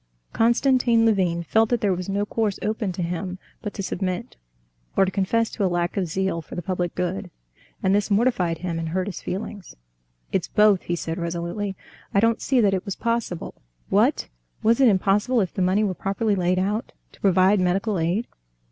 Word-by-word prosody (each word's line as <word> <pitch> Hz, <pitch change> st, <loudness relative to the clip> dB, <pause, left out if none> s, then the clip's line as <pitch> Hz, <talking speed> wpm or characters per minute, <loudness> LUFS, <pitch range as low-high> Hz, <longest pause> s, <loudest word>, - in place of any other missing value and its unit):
Konstantin 235 Hz, 0 st, +3 dB
Levin 180 Hz, -6 st, +2 dB
felt 220 Hz, +6 st, +2 dB
that 240 Hz, -, +1 dB
there 200 Hz, -3 st, +2 dB
was 180 Hz, +1 st, -4 dB
no 200 Hz, +1 st, 0 dB
course 210 Hz, -2 st, -1 dB
open 215 Hz, -2 st, -1 dB
to 180 Hz, 0 st, -3 dB
him 180 Hz, +2 st, -3 dB, 0.2 s
but 210 Hz, -, -4 dB
to 195 Hz, -, -4 dB
submit, 185 Hz, -1 st, -3 dB, 0.6 s
or 195 Hz, -, +6 dB
to 190 Hz, -, -2 dB
confess 220 Hz, +4 st, +1 dB
to 210 Hz, -, -2 dB
a 190 Hz, -, +3 dB
lack 175 Hz, 0 st, -1 dB
of 190 Hz, -3 st, 0 dB
zeal 185 Hz, 0 st, -1 dB
for -, -, -10 dB
the 175 Hz, -, -3 dB
public 180 Hz, -1 st, -2 dB
good. 180 Hz, -, -2 dB, 0.5 s
And 190 Hz, -, +3 dB
this 205 Hz, +1 st, +1 dB
mortified 200 Hz, -6 st, +2 dB
him 170 Hz, 0 st, -3 dB
and 165 Hz, -1 st, -3 dB
hurt 185 Hz, +2 st, -1 dB
his 195 Hz, -3 st, -6 dB
feelings. 195 Hz, -1 st, -6 dB, 0.6 s
"It's -, -, 0 dB
both," 210 Hz, -3 st, +4 dB
he 175 Hz, -, -2 dB
said 165 Hz, 0 st, -4 dB
resolutely: 170 Hz, +4 st, -3 dB, 0.4 s
"I -, -, +6 dB
don't 230 Hz, +2 st, +2 dB
see 260 Hz, -2 st, +2 dB
that 200 Hz, -3 st, +3 dB
it 185 Hz, -, -1 dB
was 200 Hz, -, -4 dB
possible...." 230 Hz, -7 st, -3 dB, 0.3 s
"What! -, -, +2 dB, 0.4 s
was 230 Hz, +4 st, +4 dB
it 265 Hz, -, +7 dB
impossible, 205 Hz, +4 st, +2 dB
if 190 Hz, -5 st, -1 dB
the -, -, -2 dB
money 185 Hz, +4 st, +3 dB
were 200 Hz, -3 st, 0 dB
properly 200 Hz, +4 st, -1 dB
laid 180 Hz, -1 st, +1 dB
out, 205 Hz, +4 st, -1 dB, 0.2 s
to -, -, -21 dB
provide 190 Hz, +1 st, +4 dB
medical 190 Hz, +2 st, +1 dB
aid?" 175 Hz, +8 st, 0 dB
195 Hz, 195 wpm, -24 LUFS, 180-215 Hz, 0.6 s, it